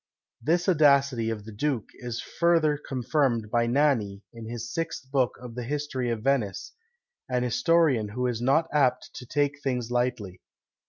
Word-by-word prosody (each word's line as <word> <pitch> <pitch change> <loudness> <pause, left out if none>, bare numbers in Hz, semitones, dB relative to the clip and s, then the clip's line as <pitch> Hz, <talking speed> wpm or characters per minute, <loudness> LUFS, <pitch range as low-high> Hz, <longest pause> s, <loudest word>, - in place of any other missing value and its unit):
This 175 +4 +1
audacity 140 -8 +4
of 105 -2 -4
the 110 - -9
duke 125 +1 -2
is 120 -2 -6
further 165 -3 +2
confirmed 130 -5 -1
by 120 0 +2
Nani, 120 -7 +1
in 115 -1 -9
his 120 0 -6
sixth 155 -6 -4
book 130 -3 +1
of 125 -2 -9
the 125 - -5
History 130 -1 -2
of 115 -2 -3
Venice; 125 -8 -1 0.6
an 125 -1 0
historian 155 - +2
who 125 +4 -3
is 120 -2 -1
not 140 +6 +3
apt 130 -4 +2
to 125 - -9
take 145 +1 0
things 125 -4 -2
lightly. 120 -7 -2
125 Hz, 160 wpm, -27 LUFS, 115-145 Hz, 0.6 s, audacity